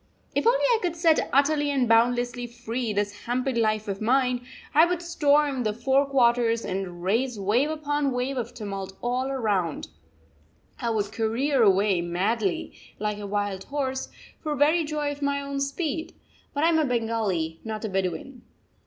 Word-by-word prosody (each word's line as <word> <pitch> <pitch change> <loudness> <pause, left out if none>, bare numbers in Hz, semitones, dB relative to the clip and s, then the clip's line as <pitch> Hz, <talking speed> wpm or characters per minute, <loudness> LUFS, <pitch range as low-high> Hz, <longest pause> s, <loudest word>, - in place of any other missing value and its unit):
If - - +1
only 485 +1 +5
I 475 -3 +3
could 350 -2 -1
set 330 -2 +3
utterly 290 +1 +3
and 270 -4 +1
boundlessly 245 +2 +2
free 240 0 -4
this 205 0 -3
hampered 255 +1 0
life 215 -2 +1
of 195 0 -4
mine, 250 +1 +2 0.3
I 310 - +7
would 350 0 +1
storm 295 -5 +2
the 215 -3 0
four 270 +5 +2
quarters 240 -3 +2
and 185 -2 -4
raise 230 +4 0
wave 225 +9 +2
upon 295 -2 -1
wave 250 +2 -1
of 245 -3 -3
tumult 195 -3 -6
all 250 +2 -1
round; 205 -10 -1 0.9
I 235 - -1
would 210 -2 -1
career 240 +5 +1
away 195 -3 +4
madly, 190 +4 -1 0.2
like 210 0 -2
a 205 - -5
wild 205 -1 -2
horse, 265 -2 -3 0.3
for 305 -2 -2
very 310 +4 +3
joy 295 -1 -2
of 290 0 -8
my 280 0 0
own 280 0 -4
speed! 295 +3 -3 0.4
But 290 - 0
I 330 - +5
am 325 -1 +3
a 310 - +2
Bengali, 220 - -1
not 220 0 -4
a - - -2
Bedouin! 195 +7 -3
245 Hz, 170 wpm, -26 LUFS, 210-280 Hz, 0.9 s, I